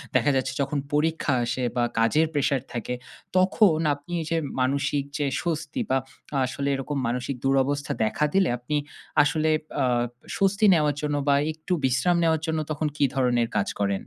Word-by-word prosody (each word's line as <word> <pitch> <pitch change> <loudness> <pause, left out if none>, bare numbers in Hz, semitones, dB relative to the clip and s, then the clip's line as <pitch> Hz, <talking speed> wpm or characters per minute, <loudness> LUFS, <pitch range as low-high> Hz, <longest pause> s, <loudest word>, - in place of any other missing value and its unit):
দেখা 145 - +4
যাচ্ছে 130 -1 0
যখন 140 +1 -1 0.2
পরীক্ষা 155 -1 +1
আসে 125 +2 -2
বা 120 - +2 0.2
কাজের 150 +8 +3
প্রেশার 140 -2 +1
থাকে 120 +1 -3 0.4
তখন 185 -2 +4 0.2
আপনি 145 +4 -11
এইযে 165 +1 -1 0.2
মানসিক 140 +2 +1
যে 145 - 0 0.2
স্বস্তি 155 -3 -3
বা 130 - +3 0.5
আসলে 140 +3 -3
এরকম 135 +2 -3
মানসিক 125 +2 -2
দুরবস্থা 135 +1 +1
দেখা 110 +7 +1
দিলে 195 -2 +3
আপনি 125 +5 -3 0.5
আসলে 155 +1 +1 0.3
আ - - +3 0.5
স্বস্তি 200 +2 +2
নেওয়ার 150 -3 +2
জন্য 145 -1 -1
বা 140 - +5 0.2
একটু 160 +4 -4
বিশ্রাম 130 +8 +2
নেওয়ার 160 -1 +2
জন্য 160 -1 0
তখন 155 +1 -1
কি - - +2
ধরনের 125 -3 +2
কাজ 100 - 0
করেন? 100 0 +2
145 Hz, 160 wpm, -25 LUFS, 130-160 Hz, 0.5 s, বা